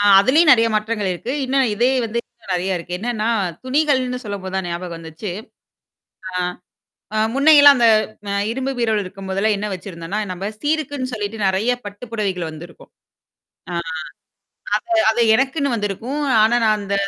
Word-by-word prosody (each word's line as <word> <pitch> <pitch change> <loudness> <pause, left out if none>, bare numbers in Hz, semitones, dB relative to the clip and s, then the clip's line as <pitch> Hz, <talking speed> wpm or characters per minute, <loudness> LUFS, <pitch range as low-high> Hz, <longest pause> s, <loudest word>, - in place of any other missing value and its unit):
ஆ - - +1 0.2
அதுலேயும் 295 +8 +5
நெறைய 230 -2 +4
மாற்றங்கள் 215 -2 -1
இருக்கு. 235 +9 -5
இன்னும் 265 -1 +2
இதே 245 +4 +2
வந்து 230 +1 -2
இன்னும் 220 -5 -9
நறைய 185 +1 -1
இருக்கு. 175 +1 -5
என்னன்னா 230 -1 -1 0.4
துணிகள்னு 260 -2 +1
சொல்லும்போ 200 -2 -5
தான் 190 -2 -2
ஞாபகம் 170 0 -5
வந்துச்சு. 165 +4 -7 1.0
ஆ. - - -15 0.8
அ - - +2 0.2
முன்னையெல்லாம் 285 -1 +7
அந்த 235 -1 +4 0.4
அ - - -1 0.2
இரும்பு 265 +2 -2
பீரோல் 220 -3 +1
இருக்கும்போதெல்லாம் 195 +3 -1
என்ன 210 - -3
வச்சிருந்தோன்னா, 180 +1 -5
நம்ம 190 +3 -4
சீருக்குன்னு 290 -4 -2
சொல்லிட்டு 215 0 -4
நெறைய 195 +6 +1
பட்டு 205 +4 -8
புடவைகள் 190 -7 -2
வந்திருக்கும். 160 +1 -12 0.8
ஆ. - - -3 1.0
அத - - -2 0.2
அது 235 +2 +1
எனக்குன்னு 275 +1 0
வந்திருக்கும். 230 +7 -3 0.2
ஆனா 225 +3 +4
நான் 215 -1 +3
அந்த 200 0 -4
215 Hz, 150 wpm, -20 LUFS, 190-255 Hz, 1.0 s, முன்னையெல்லாம்